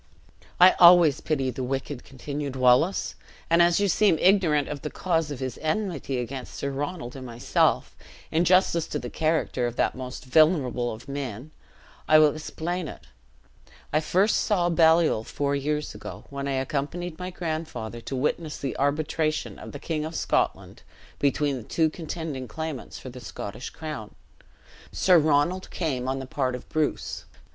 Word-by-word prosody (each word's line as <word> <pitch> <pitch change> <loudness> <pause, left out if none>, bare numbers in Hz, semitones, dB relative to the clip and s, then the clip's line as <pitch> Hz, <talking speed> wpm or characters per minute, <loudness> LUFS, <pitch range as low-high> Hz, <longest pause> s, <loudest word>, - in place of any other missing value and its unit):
"I 180 +1 +9
always 170 -4 +7
pity 135 -4 0
the 130 +1 -5
wicked," 135 0 -3
continued 140 +1 -5
Wallace; 130 +9 +3 0.4
"and 170 +1 +6
as 170 +1 +4
you 200 - +2
seem 200 -3 +3
ignorant 175 -7 +3
of 145 -2 -5
the 150 - -4
cause 165 -3 -1
of 145 - -5
his 130 -3 -4
enmity 155 -5 -2
against 125 +1 -5
Sir 140 - -3
Ronald 145 -1 -4
and 135 - -7
myself, 120 -1 0 0.4
in 165 +2 +2
justice 175 -2 +3
to - - -3
the 125 -4 -6
character 155 -6 0
of 120 - -5
that - - +1
most 130 0 -7
venerable 130 -4 +3
of 110 +4 -10
men, 135 -1 -5 0.6
I 155 - +7
will 155 -2 +6
explain 165 +2 -4
it. 60 - -10 0.9
I 155 - +4
first 185 +7 +2
saw 180 -5 +1
Baliol 160 -7 +4
four 140 +4 -1
years 150 +2 -2
ago, - - -9
when 140 0 -4
I 140 - -1
accompanied 150 +6 -3
my 180 0 -4
grandfather 155 -10 -5
to 135 - -5
witness 150 +4 -1
the 135 - -4
arbitration 155 +2 -1
of - - -9
the - - -7
King 155 +1 -3
of 160 +1 -5
Scotland - - -1 0.4
between 145 0 +1
the 120 - -7
two 160 -2 +2
contending 160 -5 -5
claimants 160 -3 -6
for 130 - -9
the 125 0 -10
Scottish 105 +1 -7
crown. 150 -10 -7 0.8
Sir 180 -2 +5
Ronald 155 +5 +1
came 135 -7 -2
on 135 +1 -1
the 135 - -5
part 130 -1 -1
of 125 - -9
Bruce. 155 -1 -2
150 Hz, 165 wpm, -26 LUFS, 130-165 Hz, 0.9 s, I